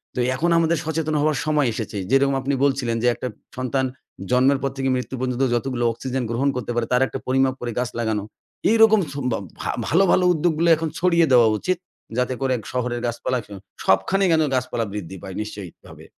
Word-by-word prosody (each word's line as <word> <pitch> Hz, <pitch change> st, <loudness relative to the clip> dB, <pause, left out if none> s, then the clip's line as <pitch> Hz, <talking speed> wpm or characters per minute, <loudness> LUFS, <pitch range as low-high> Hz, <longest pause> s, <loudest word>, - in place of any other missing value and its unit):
তো -, -, -2 dB, 0.2 s
এখন 170 Hz, +6 st, 0 dB
আমাদের 165 Hz, 0 st, +2 dB
সচেতন 160 Hz, -1 st, -1 dB
হওয়ার 150 Hz, -2 st, +1 dB
সময় 150 Hz, -3 st, +2 dB
এসেছে। 110 Hz, -2 st, -5 dB
যেরকম 135 Hz, 0 st, +3 dB
আপনি 140 Hz, +1 st, -1 dB
বলছিলেন 130 Hz, -4 st, +1 dB
যে, -, -, +3 dB
"একটা 125 Hz, -, -4 dB, 0.3 s
সন্তান 130 Hz, +1 st, 0 dB, 0.5 s
জন্মের 130 Hz, +2 st, +4 dB
পর 135 Hz, -, 0 dB
থেকে 135 Hz, 0 st, 0 dB
মৃত্যু 125 Hz, +1 st, -5 dB
পর্যন্ত, 130 Hz, 0 st, -1 dB
যতগুলো 120 Hz, 0 st, -1 dB
অক্সিজেন 130 Hz, +2 st, -3 dB
গ্রহণ 135 Hz, +4 st, +1 dB
করতে 120 Hz, -1 st, -3 dB
পারে, 120 Hz, -1 st, +1 dB
তার 125 Hz, -, +3 dB
একটা 135 Hz, -, -6 dB
পরিমাপ 130 Hz, 0 st, +2 dB
করে 120 Hz, -1 st, -3 dB
গাছ 125 Hz, -, -1 dB
লাগানো।" 110 Hz, -3 st, -1 dB, 0.5 s
এইরকম 220 Hz, -1 st, +6 dB
সোমব 125 Hz, -4 st, -2 dB, 0.3 s
ভা -, -, -4 dB, 0.2 s
ভালো, 175 Hz, +7 st, +4 dB
ভালো 180 Hz, -, +4 dB
উদ্যোগগুলো 165 Hz, +1 st, +1 dB
এখন 160 Hz, +1 st, -3 dB
ছড়িয়ে 170 Hz, -2 st, +4 dB
দেওয়া 120 Hz, -3 st, +6 dB
উচিত। 185 Hz, -1 st, 0 dB, 0.4 s
যাতে 125 Hz, +1 st, +1 dB
করে 130 Hz, -1 st, +1 dB, 0.2 s
শহরের 125 Hz, -1 st, -2 dB
গাছপালা, 120 Hz, +2 st, -1 dB
স -, -, -24 dB, 0.4 s
সবখানেই 180 Hz, -, +3 dB
যেন 160 Hz, -, +3 dB
গাছপালা 120 Hz, -2 st, -1 dB
বৃদ্ধি 95 Hz, -2 st, -6 dB
পায়, 95 Hz, -1 st, -7 dB
নিশ্চয়ভাবে। 100 Hz, -4 st, -9 dB
130 Hz, 185 wpm, -22 LUFS, 120-155 Hz, 0.5 s, এইরকম